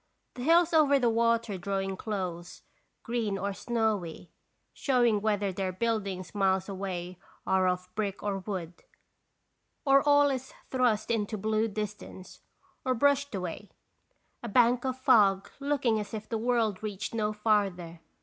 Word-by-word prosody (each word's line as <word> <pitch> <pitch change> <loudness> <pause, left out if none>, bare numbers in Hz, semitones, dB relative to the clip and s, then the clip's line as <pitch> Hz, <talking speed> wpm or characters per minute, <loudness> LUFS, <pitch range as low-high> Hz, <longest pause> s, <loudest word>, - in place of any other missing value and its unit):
The 250 - -8
hills 335 +4 +4
over 295 -3 +5
the 245 -3 +2
water 230 -3 +1
drawing 195 +1 -2
close, 185 -5 -5 0.4
green 225 -4 -1
or 200 +1 -2
snowy, 205 -8 -2 0.4
showing 240 -6 +2
whether 205 -2 0
their 190 0 -2
buildings 195 -3 -2
miles 190 -2 +1
away 185 -2 -5 0.3
are 190 -1 +2
of 180 0 -1
brick 200 -1 -3
or 200 -2 -1
wood, 185 -4 -6 1.0
or 275 0 +6
all 290 0 +4
is 260 -1 -5 0.2
thrust 245 -4 +1
into 215 -1 -1
blue 215 +2 0
dis 210 -1 -3
tance, 185 -2 -13 0.4
or 255 -1 +1
brushed 285 0 +2
away, 185 +2 -5 0.7
a 235 - -5
bank 245 +3 +3
of 260 -1 -1
fog 200 -6 +4
looking 275 -6 +1
as 210 +1 -5
if 215 0 -7
the 225 - -2
world 230 -4 0
reached 210 -1 -5
no 215 -2 0
farther. 200 -6 0
210 Hz, 145 wpm, -29 LUFS, 195-240 Hz, 1.0 s, or